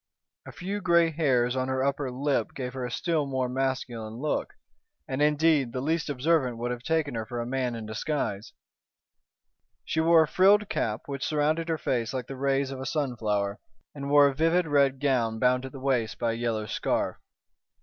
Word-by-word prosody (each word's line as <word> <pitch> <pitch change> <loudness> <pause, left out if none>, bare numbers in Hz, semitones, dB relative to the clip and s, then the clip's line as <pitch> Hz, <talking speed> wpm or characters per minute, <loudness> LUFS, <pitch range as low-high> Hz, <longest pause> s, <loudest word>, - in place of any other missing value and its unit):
A - - -7
few 200 +3 -4
grey 170 -3 +4
hairs 130 -6 +1
on 130 0 -1
her 130 0 0
upper 140 0 -1
lip 135 +3 -1
gave 125 -2 -4
her 130 -1 -4
a 125 - -3
still 155 +3 -1
more 130 -2 -1
masculine 125 -4 -3
look, 145 +5 -2 0.5
and, 130 +2 -2
indeed, 150 -4 +3
the 130 - -2
least 155 +3 -1
observant 135 -3 +1
would 120 +1 -2
have 120 -1 -4
taken 155 +1 0
her 115 -1 -2
for 120 +2 -5
a 120 - -2
man 125 -1 -1
in 115 -1 -6
disguise. 110 -2 -3 1.3
She - - -1
wore 165 0 +6
a - - -3
frilled 200 +5 +4
cap, 110 -1 -1
which 140 -2 -5
surrounded 155 +2 0
her 165 - +1
face 120 -4 -1
like 125 -2 -3
the 135 - -7
rays 135 0 0
of 135 - -6
a - - -5
sunflower, 110 -9 -1 0.3
and 140 -1 -6
wore 145 0 +7
a 140 - 0
vivid 165 +5 +2
red 140 -3 +2
gown 125 -6 +1
bound 125 +2 +2
at - - -11
the 135 - -9
waist 130 -5 0
by 115 -1 0
a - - -2
yellow 115 -2 -2
scarf. - - -1
Mrs. - - -40
135 Hz, 200 wpm, -27 LUFS, 120-150 Hz, 1.3 s, wore